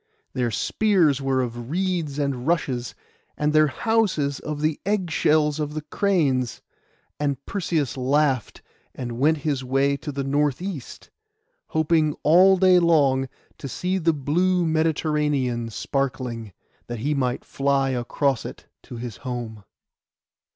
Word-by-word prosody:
Their 125 -2 0
spears 165 - +2
were 135 -1 +1
of 120 -1 -5
reeds 170 -4 -1
and 140 -3 -2
rushes, 135 -8 -1 0.4
and 150 0 0
their 155 0 +5
houses 185 - 0
of 150 -1 -5
the 155 -1 0
egg 195 -4 -1
shells 150 0 +2
of 150 0 -3
the 155 - -4
cranes; 150 - 0 0.6
and 140 -2 -2
Perseus 160 -9 -2
laughed, 135 -2 0 0.3
and 120 -2 -5
went 155 +4 +3
his 140 -4 0
way 135 +2 +1
to 145 +2 -6
the 140 0 -3
north 145 0 +1
east, 180 -8 -7 0.6
hoping 160 -1 +1
all 185 +5 +6
day 185 -1 +5
long 140 -6 +3 0.3
to - - -6
see 185 +7 -1
the 165 -1 +3
blue 175 +5 +1
Mediterranean 150 -6 0
sparkling, 125 -3 -3 0.4
that 120 - -5
he 145 +4 0
might 125 -3 -1
fly 140 -1 +1
across 130 +1 0
it - - -9 0.2
to - - -10
his 115 -2 -6
home. 120 -4 -6
145 Hz, 135 wpm, -24 LUFS, 130-160 Hz, 0.6 s, all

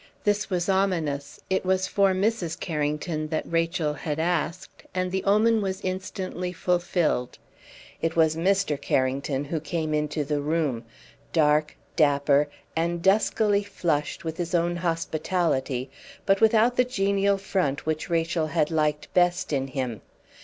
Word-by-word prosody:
This 205 0 +1
was 180 -2 -1
ominous; 165 -8 0
it 190 - 0
was 190 0 +1
for 195 0 +3
Mrs. 190 -4 -1
Carrington 155 0 -2
that 155 0 -2
Rachel 165 -2 0
had 150 0 -4
asked; 170 +1 -2
and 185 0 -1
the 190 0 -1
omen 215 +2 +4
was 190 -1 -2
instantly 185 -1 -4
fulfilled. 175 -7 0 0.6
It 165 0 -1
was 160 -1 +4
Mr. 180 -3 +1
Carrington 135 +1 0
who 160 +3 -2
came 155 0 -2
into 150 0 0
the 145 0 -1
room, 145 -6 -1 0.5
dark, 150 -1 +2 0.2
dapper, 145 -1 +3 0.3
and 170 +1 -1
duskily 205 +1 +3
flushed 160 -7 -2
with 160 0 -4
his 175 0 -2
own 175 0 +1
hospitality, 160 -6 -1 0.3
but 195 +1 +3
without 225 +2 +4
the 250 - +6
genial 200 -4 +1
front 180 -7 -1
which 155 +3 -2
Rachel 165 -1 0
had 150 +1 0
liked 150 -2 0
best 175 -3 +2
in 135 -1 0
him. 130 -6 -4
165 Hz, 140 wpm, -26 LUFS, 150-190 Hz, 0.6 s, the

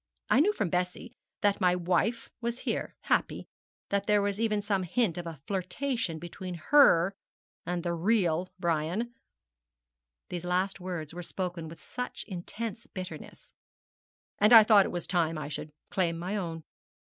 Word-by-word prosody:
I - - +6
knew 370 +8 +5
from 200 - -2
Bessie 180 0 -2 0.3
that 205 0 +2
my 180 -1 +4
wife 180 +7 0
was 235 +1 -3
here, - - -2
happy. - - 0 0.4
There 200 +1 +2
was 200 0 -1
even 215 -2 +1
some 200 -2 +1
hint 185 0 0
of 175 -1 -5
a 160 -4 -7
flirtation 195 - -2
between 175 +2 -7
her 185 - +5 0.5
and 175 -1 -1
the 175 -1 -1
real 180 -1 +1
Brian,' 170 +7 -1 1.2
these 175 -1 -4
last 185 +2 0
words 175 -4 -5
were 175 - -5
spoken 175 -2 -4
with 165 +1 -12 0.4
intense 220 +4 -6
bitterness, 185 -1 -9 0.9
'and 210 +3 +6
I 225 -1 +12
thought 210 -3 +6
it - - -5
was 175 - -3
time 165 -3 +1
I 150 - -5
should 150 +1 -5 0.2
claim 170 -3 +1
my 180 +5 -3
own.' 165 -5 -4
185 Hz, 150 wpm, -29 LUFS, 170-210 Hz, 1.2 s, I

